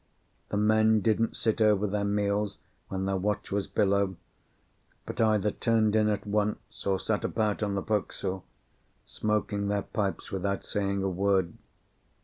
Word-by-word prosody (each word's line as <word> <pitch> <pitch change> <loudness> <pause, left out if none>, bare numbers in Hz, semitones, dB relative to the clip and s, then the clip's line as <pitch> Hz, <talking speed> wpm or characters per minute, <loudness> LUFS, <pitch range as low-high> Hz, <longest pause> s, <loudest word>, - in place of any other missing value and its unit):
The 105 - -1
men 110 +1 +4
didn't 110 +2 +1
sit 110 0 0
over 105 -1 +4
their 105 0 -1
meals 100 0 0 0.3
when 95 0 -3
their 95 0 0
watch 105 +2 -2
was 100 0 0
below, 100 -2 +1 0.9
but - - -3
either 105 -2 +3
turned 110 -2 +2
in 105 -1 +4
at 105 0 -1
once 105 0 -2
or 95 -1 +2
sat 105 +2 -1
about 110 -2 0
on 100 -2 0
the 100 - -1
forecastle, 95 -3 -2 0.6
smoking 105 -1 -1
their 100 -1 0
pipes 100 -2 -3
without 100 +1 -2
saying 100 -1 -1
a - - +1
word. 95 -2 +1
105 Hz, 150 wpm, -28 LUFS, 100-105 Hz, 0.9 s, men